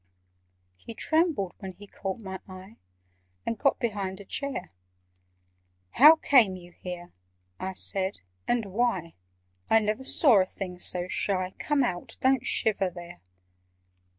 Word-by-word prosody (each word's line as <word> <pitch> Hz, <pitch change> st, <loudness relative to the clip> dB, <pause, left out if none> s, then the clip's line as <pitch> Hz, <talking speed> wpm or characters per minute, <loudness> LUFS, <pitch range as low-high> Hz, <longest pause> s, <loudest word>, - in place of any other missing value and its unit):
He 225 Hz, -, -10 dB
trembled 315 Hz, -, +1 dB
when 190 Hz, -1 st, -7 dB
he 205 Hz, -, -13 dB
caught 195 Hz, -1 st, -5 dB
my 190 Hz, -4 st, -7 dB
eye, 185 Hz, +3 st, -11 dB, 0.7 s
And 230 Hz, -, -2 dB
got 275 Hz, -, +3 dB
behind 200 Hz, -5 st, -3 dB
a 200 Hz, -, -10 dB
chair. 270 Hz, -3 st, -4 dB, 1.2 s
"How 300 Hz, +5 st, +9 dB
came 245 Hz, -11 st, +4 dB
you 175 Hz, -1 st, -12 dB
here," 175 Hz, 0 st, -8 dB, 0.5 s
I 190 Hz, 0 st, -4 dB
said, 190 Hz, +1 st, -3 dB, 0.3 s
"and 240 Hz, -2 st, +1 dB
why? 195 Hz, -4 st, -1 dB, 0.6 s
I 225 Hz, -, +6 dB
never 215 Hz, +3 st, 0 dB
saw 260 Hz, -, +5 dB
a -, -, +1 dB
thing 180 Hz, -2 st, -7 dB
so 180 Hz, 0 st, -3 dB
shy. 185 Hz, -1 st, -1 dB
Come 295 Hz, -2 st, +1 dB
out! 175 Hz, -8 st, -2 dB
Don't 260 Hz, -1 st, +3 dB
shiver 200 Hz, -4 st, +2 dB
there!" 175 Hz, 0 st, -11 dB
195 Hz, 135 wpm, -27 LUFS, 185-240 Hz, 1.2 s, How